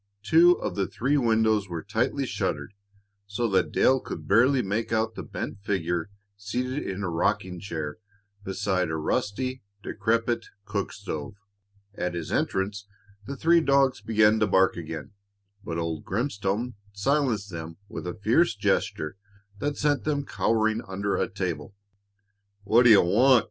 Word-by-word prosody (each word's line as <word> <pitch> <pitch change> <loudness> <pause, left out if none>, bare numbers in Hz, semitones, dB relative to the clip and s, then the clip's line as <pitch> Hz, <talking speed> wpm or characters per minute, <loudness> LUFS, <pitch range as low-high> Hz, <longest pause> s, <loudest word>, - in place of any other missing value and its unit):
Two 165 +9 +6
of - - -4
the 100 -1 -1
three 135 +5 0
windows 110 -5 +2
were 85 -2 -4
tightly 115 +6 0
shuttered, 100 - -3 0.5
so 110 +4 -1
that 95 -5 +2
Dale 130 0 +4
could - - -7
barely 125 +5 +4
make 105 +4 -2
out 110 0 +1
the - - -6
bent 100 - -6
figure 90 -3 -1 0.3
seated 125 +7 -3
in 95 +1 -4
a - - -1
rocking 90 +2 0
chair 80 -4 -5 0.4
beside 95 -2 -1
a 80 - -2
rusty, 125 +11 -2 0.2
decrepit 115 +2 0 0.2
cook 100 -2 -2
stove. 90 -5 -6 0.6
At 90 -3 -3
his 85 -2 -5
entrance 100 +1 -1 0.4
the 140 0 -5
three 170 +4 +4
dogs 140 -5 +3
began 110 0 +3
to 110 - +3
bark 95 -1 +3
again, 80 -1 -6 0.5
but 85 -4 -4
old 85 -2 -3
Grimstone 110 +1 -2 0.2
silenced 110 -2 0
them 80 -1 -7
with 90 - -6
a 90 - -4
fierce 115 +6 +2
gesture 95 -4 -1 0.4
that 145 0 -2
sent 145 -1 +1
them 145 -2 -1
cowering 110 -2 +1
under 100 +1 -1
a - - 0
table. 90 -4 -4 0.9
"What 115 +4 +4
d' - - +8
you 105 -3 +8
want?" 120 +8 +5
105 Hz, 150 wpm, -26 LUFS, 95-120 Hz, 0.9 s, d